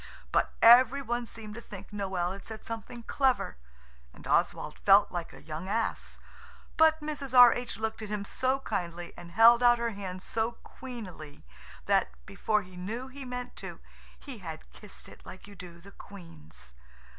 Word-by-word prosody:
But -, -, +1 dB
every 250 Hz, +4 st, +7 dB
one 240 Hz, -1 st, -2 dB
seemed 215 Hz, -2 st, -9 dB
to 235 Hz, -, -8 dB
think 200 Hz, -3 st, -11 dB
Noël 190 Hz, -3 st, -2 dB
had 195 Hz, -, -10 dB
said 220 Hz, -1 st, -9 dB
something 230 Hz, +1 st, -7 dB
clever. 260 Hz, -, 0 dB, 0.6 s
And -, -, -14 dB
Oswald -, -, 0 dB
felt 200 Hz, +1 st, +5 dB
like 175 Hz, -2 st, -4 dB
a -, -, -14 dB
young 160 Hz, +3 st, -6 dB
ass. 225 Hz, +2 st, -2 dB, 0.6 s
But 320 Hz, 0 st, +4 dB
Mrs. 280 Hz, -4 st, -3 dB
R. 245 Hz, -1 st, +10 dB
H. 245 Hz, -4 st, -5 dB
looked 220 Hz, 0 st, -3 dB
at 215 Hz, -, -6 dB
him 210 Hz, -1 st, -3 dB
so 260 Hz, +5 st, -1 dB
kindly 175 Hz, -6 st, -4 dB
and 175 Hz, 0 st, -11 dB
held 230 Hz, +3 st, +7 dB
out 240 Hz, -1 st, +6 dB
her 235 Hz, 0 st, -1 dB
hand 190 Hz, -3 st, -7 dB
so 225 Hz, +1 st, -1 dB
queenily 190 Hz, -, -10 dB, 0.4 s
that, -, -, +2 dB, 0.2 s
before 210 Hz, -, 0 dB
he 180 Hz, 0 st, -15 dB
knew 225 Hz, +9 st, -5 dB
he 270 Hz, 0 st, -9 dB
meant 250 Hz, 0 st, -6 dB
to, -, -, -7 dB, 0.4 s
he 265 Hz, -6 st, -9 dB
had 160 Hz, -4 st, -9 dB
kissed 210 Hz, -2 st, -9 dB
it -, -, -15 dB
like 185 Hz, -, -11 dB
you 205 Hz, -, -12 dB
do 175 Hz, -3 st, -11 dB
the 195 Hz, +3 st, -14 dB
Queen's. 80 Hz, -, -12 dB
215 Hz, 175 wpm, -29 LUFS, 185-245 Hz, 0.6 s, R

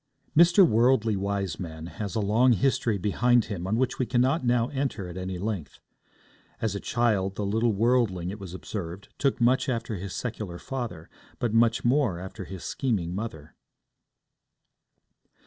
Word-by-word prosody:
Mr. 170 Hz, +3 st, +7 dB
Worldly 115 Hz, -3 st, +3 dB
Wiseman 95 Hz, -5 st, -3 dB
has 100 Hz, +4 st, -5 dB
a -, -, +1 dB
long 115 Hz, +5 st, +4 dB
history 120 Hz, -2 st, +1 dB
behind 120 Hz, +5 st, +2 dB
him 95 Hz, -4 st, -5 dB
on 110 Hz, +3 st, +1 dB
which 130 Hz, +1 st, 0 dB
we 130 Hz, -, 0 dB
cannot 130 Hz, +4 st, +2 dB
now 120 Hz, -1 st, +2 dB
enter 135 Hz, -9 st, -2 dB
at 85 Hz, -, -8 dB
any 95 Hz, 0 st, -4 dB
length. 95 Hz, -5 st, -4 dB, 0.8 s
As 110 Hz, -3 st, -1 dB
a 100 Hz, -, -3 dB
child, 100 Hz, -6 st, 0 dB
the 105 Hz, -, -2 dB
little 110 Hz, +4 st, +1 dB
worldling, 105 Hz, -5 st, +1 dB
it 105 Hz, -, -8 dB
was 95 Hz, -2 st, -8 dB
observed, 95 Hz, -1 st, -6 dB
took 140 Hz, -2 st, +1 dB
much 125 Hz, +3 st, +3 dB
after 115 Hz, -3 st, -2 dB
his 95 Hz, +1 st, -6 dB
secular 105 Hz, -7 st, -4 dB
father, 115 Hz, -9 st, -5 dB, 0.3 s
but 120 Hz, -3 st, -1 dB
much 115 Hz, +1 st, +3 dB
more 125 Hz, -7 st, +2 dB
after 95 Hz, +2 st, -7 dB
his 95 Hz, -2 st, -8 dB
scheming 100 Hz, -10 st, -1 dB
mother. 90 Hz, -7 st, -6 dB
110 Hz, 155 wpm, -27 LUFS, 95-120 Hz, 0.8 s, Mr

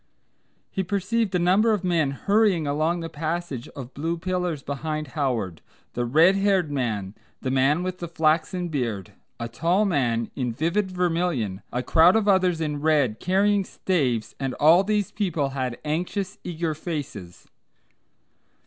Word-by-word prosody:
He 190 Hz, -, -1 dB
perceived 200 Hz, +2 st, -1 dB
a -, -, +5 dB
number 190 Hz, +6 st, +3 dB
of 205 Hz, -3 st, -1 dB
men 170 Hz, -5 st, +2 dB
hurrying 200 Hz, +3 st, +2 dB
along 155 Hz, +4 st, 0 dB
the 165 Hz, -, -4 dB
passage 160 Hz, -4 st, -4 dB
of 130 Hz, -2 st, -8 dB
blue 165 Hz, +4 st, -2 dB
pillars 180 Hz, -4 st, -2 dB
behind 155 Hz, +2 st, -4 dB
Howard, 115 Hz, -, -2 dB, 0.3 s
the 120 Hz, -, -1 dB
red 160 Hz, +10 st, +5 dB
haired 195 Hz, -5 st, +2 dB
man, 110 Hz, -8 st, -2 dB, 0.3 s
the 130 Hz, -, -1 dB
man 135 Hz, +6 st, +2 dB
with 185 Hz, 0 st, -4 dB
the 175 Hz, -, -4 dB
flaxen 165 Hz, +2 st, 0 dB
beard, 115 Hz, -, -3 dB, 0.3 s
a 115 Hz, -, -3 dB
tall 170 Hz, -, +1 dB
man 120 Hz, -, 0 dB
in 125 Hz, -4 st, -2 dB
vivid 170 Hz, -, 0 dB
vermilion, 170 Hz, -, -1 dB
a 125 Hz, +1 st, -2 dB
crowd 165 Hz, -, +5 dB
of 220 Hz, -2 st, +2 dB
others 185 Hz, -4 st, +3 dB
in 150 Hz, -2 st, -2 dB
red 145 Hz, -8 st, +2 dB
carrying 200 Hz, +4 st, +2 dB
staves, 135 Hz, -, -1 dB
and 135 Hz, -1 st, -2 dB
all 165 Hz, +5 st, +6 dB
these 205 Hz, -1 st, 0 dB
people 170 Hz, -9 st, -1 dB
had 130 Hz, -3 st, -3 dB
anxious 180 Hz, +6 st, -2 dB
eager 165 Hz, -2 st, -2 dB
faces. 145 Hz, -, -6 dB
160 Hz, 150 wpm, -25 LUFS, 135-185 Hz, 0.3 s, all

